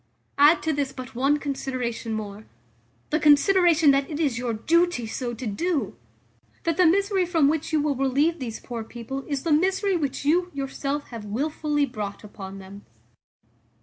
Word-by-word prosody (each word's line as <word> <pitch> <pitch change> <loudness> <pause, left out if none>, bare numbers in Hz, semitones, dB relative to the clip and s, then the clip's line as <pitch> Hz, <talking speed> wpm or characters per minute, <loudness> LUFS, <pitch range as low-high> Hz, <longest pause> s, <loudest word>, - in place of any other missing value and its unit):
Add 295 +4 +6
to 315 - 0
this 280 -2 -1
but 255 -1 -9
one 275 +4 +2
consideration 255 -5 -3
more; 210 -1 -6 0.6
the 310 - +2
consideration 320 +1 +5
that 275 0 +1
it 300 -1 -4
is 275 -7 0
your 245 -1 -2
duty 335 +2 +1
so 240 +2 -4
to 245 - -7
do 290 - -1 0.7
That 330 -2 0
the 365 -2 +5
misery 395 +2 +2
from 325 -5 +3
which 315 +2 -1
you 310 - +2
will 290 -1 0
relieve 280 +6 +1
these 235 -4 -5
poor 235 -2 -6
people 240 +4 -7
is 280 -3 -3
the 330 - -1
misery 380 +4 +2
which 285 -4 -2
you 350 +4 +2
yourself 275 +1 -3
have 230 -3 -8
wilfully 295 +6 -1
brought 210 -6 -6
upon 195 -2 -9
them." 195 +1 -11
280 Hz, 170 wpm, -25 LUFS, 240-320 Hz, 0.7 s, Add